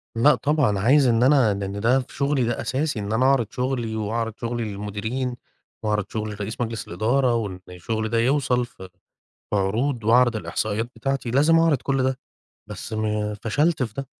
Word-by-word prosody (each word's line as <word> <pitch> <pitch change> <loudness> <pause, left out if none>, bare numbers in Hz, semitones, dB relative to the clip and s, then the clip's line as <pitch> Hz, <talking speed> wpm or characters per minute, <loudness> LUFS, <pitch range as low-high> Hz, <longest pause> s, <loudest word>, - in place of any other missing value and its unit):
لأ 145 +6 +5
طبعًا، 140 -10 +1
عايز 130 +5 +4
إن 115 0 +3
أنا 130 -6 +4
لأن 100 0 -4
ده 125 +5 +3
في 125 - -8
شغلي 140 -2 +1
ده 120 0 -1
أساسي 135 -2 -1
إن 100 +1 -3
أنا 125 +3 +2
أعرض 130 -5 +3
شغلي، 125 -3 -2
وأعرض 110 +1 -2
شغلي 120 0 -2
للمديرين، 110 +5 -3 0.5
وأعرض 105 -2 0
شغلي 110 -1 -4
لرئيس 105 +4 -5
مجلس 115 -1 -3
الإدارة، 120 +7 +1
وإن 100 -5 -3
الشغل 110 +5 -3
ده 115 0 +1
يوصل 125 -1 +2
ف 120 - -19 0.7
في 105 - +1
عروض 115 +5 0
وأعرض 120 0 +4
الإحصائيات 110 +1 -2
بتاعتي، 135 -3 -2
لازم 150 +6 +4
أعرض 165 -5 +3
كُلّ 135 -1 0
ده، 130 0 0 0.5
بس - - -8
ما 105 -1 -1
فشلت 145 +6 +1
في 110 -3 -3
ده. 135 -1 -5
115 Hz, 175 wpm, -23 LUFS, 105-130 Hz, 0.7 s, لأ